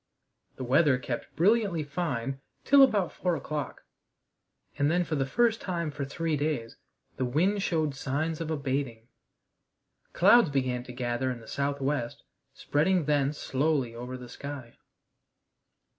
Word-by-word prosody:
The 130 - -6
weather 140 +2 +4
kept 125 -2 -5
brilliantly 195 -1 +2
fine 135 -4 -3 0.2
till 280 0 +6
about 205 -9 +4
four 180 -2 -1
o'clock, 145 -1 -5 1.0
and 145 +1 +3
then 175 +2 +2
for 165 - -5
the 135 -3 0
first 230 - +2
time 170 -4 -2
for 145 -1 -4
three 160 +3 -2
days 145 -6 -2 0.4
the - - -1
wind 175 +11 +1
showed 155 -6 0
signs 150 +5 -2
of 160 - -3
abating. 135 -6 -3 1.0
Clouds 205 +1 +6
began 130 -3 -1
to 125 - -8
gather 125 +1 -2
in 125 -2 -4
the 110 - -14
southwest, 140 -2 -2 0.3
spreading 170 +3 +1
thence 145 0 +1
slowly 135 -3 0
over 125 +2 -6
the 125 -1 -10
sky. 130 -1 -8
145 Hz, 140 wpm, -28 LUFS, 130-165 Hz, 1.0 s, till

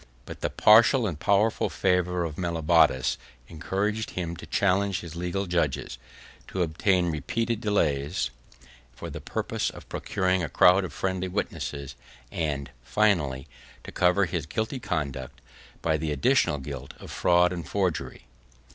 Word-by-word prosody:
But - - -9
the - - 0
partial 115 +3 +6
and 85 -8 -3
powerful 105 +5 +2
favor 90 -1 +1
of 80 -3 -5
Mellobaudes 80 -6 +2 0.3
encouraged 105 - -2
him 85 -7 -4
to - - -10
challenge 100 0 +1
his 85 -1 -9
legal 90 +3 -2
judges, 75 -8 -1 0.5
to 95 - -1
obtain 85 +2 +1
repeated 115 - -2
delays 80 -6 0 0.6
for - - -7
the - - -7
purpose - - -2
of - - -12
procuring 95 -1 0
a 80 - -2
crowd 90 +7 +5
of 85 - -7
friendly 95 +4 -2
witnesses, 70 -7 -4 0.4
and, 70 -5 -3
finally, 70 - +1 0.4
to - - -9
cover 90 +3 +3
his 85 -4 -3
guilty 110 - -2
conduct, 70 - -4 0.4
by 80 -1 +2
the 75 0 -2
additional 75 +1 +2
guilt 70 -1 -7
of - - -10
fraud 90 +1 +3
and 85 -4 -6
forgery. 95 -6 -2
90 Hz, 140 wpm, -26 LUFS, 75-95 Hz, 0.6 s, partial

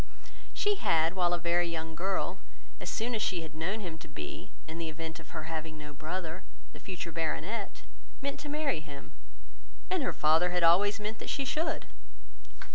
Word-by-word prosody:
She 415 -1 +2
had, 165 - +4
while 175 -2 +4
a 175 - +4
very 175 +1 +3
young 160 -1 -2
girl, 190 +4 0 0.4
as - - -3
soon 235 +2 0
as 220 - +1
she 175 -5 +1
had 155 -1 -7
known 185 +8 -1
him 165 -4 -4
to 165 - -9
be, 75 - -6 0.2
in 160 +1 -5
the 165 -1 -1
event 160 +2 -5
of 165 - -12
her - - -4
having 160 0 -3
no 150 -1 -7
brother, 165 +3 -3 0.3
the - - -10
future 175 -3 -4
baronet, 170 +6 -1 0.4
meant 280 0 -2
to 295 - -5
marry 295 - +1
him, 145 -2 -9 0.8
and 370 -3 +3
her - - +2
father 160 +4 +5
had 180 -1 +2
always 200 +5 +6
meant 215 +1 -3
that - - -4
she 275 - +1
should. 310 +5 0
170 Hz, 190 wpm, -32 LUFS, 160-205 Hz, 0.8 s, always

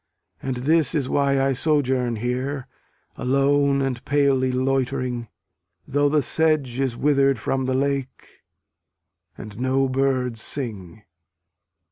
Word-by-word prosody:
And 130 -1 -3
this 150 +5 +1
is 140 -4 0
why 140 -1 +2
I 135 0 +2
sojourn 130 -4 +1
here 125 +4 -3 0.5
Alone 140 +1 +2
and 130 -3 -3
palely 140 -2 +2
loitering, 130 -2 -1 0.6
Though 145 +1 +2
the 150 -1 +2
sedge 150 -6 +1
is 130 -3 -1
wither'd 140 -2 +3
from 130 +4 -2
the 130 - 0
lake, 135 -1 -3 1.0
And 105 0 -9
no 130 +1 +1
birds 130 -3 0
sing. 110 - -5
135 Hz, 115 wpm, -23 LUFS, 125-140 Hz, 1.0 s, wither'd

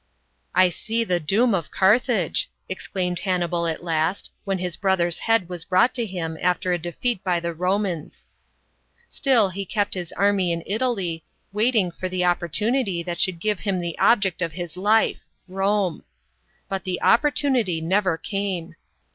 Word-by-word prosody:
"I 185 0 +6
see 225 +6 -2
the 180 -5 0
doom 210 +9 +2
of 165 -6 -1
Carthage," 205 - +2 0.2
exclaimed 180 -1 -3
Han 185 -2 0
nibal 170 -1 0
at 165 +1 -3
last, 165 +2 -1
when 195 -1 0
his 180 -2 -3
brother's 185 -4 +1
head 225 -5 +2
was 175 -2 -5
brought 185 +7 +3
to 235 -3 -1
him 165 -4 -4
after 180 +1 +1
a 175 - 0
defeat 180 +6 -2
by 180 -2 +1
the 170 0 -3
Romans. 180 -1 -2 0.8
Still 240 -8 +3
he 195 +2 -4
kept 205 +1 -1
his 175 -2 -4
army 200 -3 +2
in 170 -1 -2
Italy, 195 -7 -1 0.3
waiting 215 -4 +2
for 185 +2 -5
the 180 -1 0
opportunity 180 - +1
that 175 0 -4
should 185 -3 +1
give 210 +2 0
him 195 -3 -1
the 170 -2 -4
object 200 -7 +3
of 165 -3 -1
his 175 -1 -6
life 210 +4 +2 0.3
Rome. 195 -1 0 0.6
But 195 -2 -3
the 185 -1 -3
opportunity 255 - +3
never 185 +1 +1
came. 190 -3 -3
185 Hz, 160 wpm, -23 LUFS, 175-205 Hz, 0.8 s, I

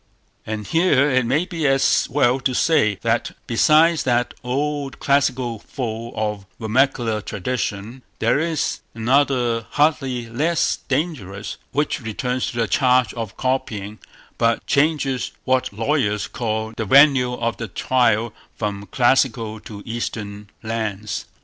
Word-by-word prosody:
And 105 -1 -4
here 150 - +3
it 130 -2 +2
may 145 +8 +1
be 165 -5 -2
as 135 0 +3
well 130 -1 +2
to 130 -1 -1
say, 110 - +3
that 115 0 0
besides 155 +7 +4
that 120 -1 +1
old 140 +2 -2
classical 130 -4 +1
foe 115 0 -5
of 105 -2 -3
vernacular 115 -1 +1
tradition, 105 +2 -4 0.2
there 115 +5 +2
is 160 -1 -1 0.2
another 120 -1 +1
hardly 135 -5 +1
less 155 +9 0
dangerous, 130 - -3
which 145 -1 -1
returns 125 +3 -2
to 120 - -8
the 115 -2 +1
charge 125 -4 +3
of 115 -4 -6
copying, 110 -5 -2 0.4
but 115 0 +1
changes 140 -3 +1
what 130 0 +1
lawyers 110 -1 0
call 110 -1 -3
the 110 - -3
venue 135 +1 +5
of 115 -1 -2
the 115 - -5
trial 115 +1 +1 0.2
from 100 -2 -4
classical 115 -2 +1
to 100 -1 -10
Eastern 105 -3 -5
lands. 110 -2 -3
120 Hz, 130 wpm, -21 LUFS, 110-135 Hz, 0.4 s, venue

